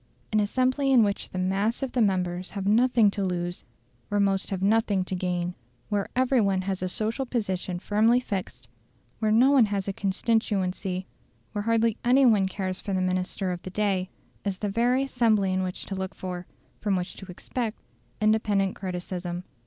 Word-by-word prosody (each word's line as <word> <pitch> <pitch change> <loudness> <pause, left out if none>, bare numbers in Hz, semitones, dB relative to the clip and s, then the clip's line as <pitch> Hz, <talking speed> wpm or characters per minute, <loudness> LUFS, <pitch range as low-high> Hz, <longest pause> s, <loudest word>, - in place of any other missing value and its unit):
An 215 - +3
assembly 255 +6 +1
in 245 -4 +7
which 200 -1 -1
the - - -7
mass 195 +7 0
of 265 - -2
the 250 - +1
members 180 -3 0
have 200 -2 -5
nothing 225 0 +4
to 200 - -2
lose, 175 -1 -2 0.5
where 205 - +1
most 195 -1 +1
have 190 -1 -3
nothing 210 -2 +2
to 185 - -6
gain, 180 -1 -1 0.4
where 205 -2 0
every 255 -1 +3
one 195 -2 +1
has 190 -1 -2
a 185 - -1
social 220 +7 -2
position 190 -8 -2
firmly 220 +6 +3
fixed, 190 - -5 0.5
where 215 -1 +1
no 245 +5 +5
one 270 -5 +6
has 200 -1 -2
a 195 - -1
constituency, 195 -2 -1 0.5
where 205 - -2
hardly 230 -1 +2
any 260 +3 +5
one 210 -5 +4
cares 190 -1 -3
for 200 - -3
the 185 - +1
minister 185 +1 -1
of 175 -1 -4
the - - -7
day, 190 -1 0 0.3
is 195 -2 -2
the 205 - -2
very 240 +5 +2
assembly 220 -7 +2
in 185 - +1
which 185 -1 -4
to - - -5
look 190 0 -4
for, 180 -1 -6 0.3
from 205 -2 0
which 180 0 -3
to 190 - -9
expect, 220 +5 -4 0.4
independent 210 -3 +2
criticism. 180 -1 -4
200 Hz, 185 wpm, -26 LUFS, 185-225 Hz, 0.5 s, in